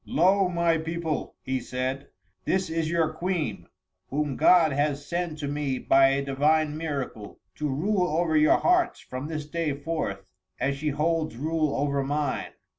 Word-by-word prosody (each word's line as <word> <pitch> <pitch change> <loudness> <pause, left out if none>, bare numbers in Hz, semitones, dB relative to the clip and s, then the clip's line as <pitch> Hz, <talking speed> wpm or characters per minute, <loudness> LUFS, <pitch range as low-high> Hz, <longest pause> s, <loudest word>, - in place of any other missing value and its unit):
"Lo! 190 +3 +3
my 170 -2 +2
people," 165 -1 -3
he 130 0 -1
said, 130 +2 -3 0.4
"this 185 -3 0
is 165 -1 -1
your 165 -2 +1
Queen, 155 - -2 0.4
whom 145 -1 -1
God 165 0 +5
has 145 0 0
sent 170 -2 -2
to 145 -2 -4
me 145 -2 -1
by 135 +1 +5
a 140 +1 0
divine 150 +2 +2
miracle, 140 -9 -5
to 150 - -3
rule 180 +7 +1
over 160 0 0
your 155 0 +5
hearts 360 -1 +2
from 130 +3 -6
this 155 -2 -4
day 155 -1 -2
forth, 140 -11 -3 0.3
as 140 +1 0
she 150 +2 -2
holds 155 -1 0
rule 155 +1 0
over 140 0 0
mine. 145 0 -2
150 Hz, 160 wpm, -26 LUFS, 140-165 Hz, 0.4 s, God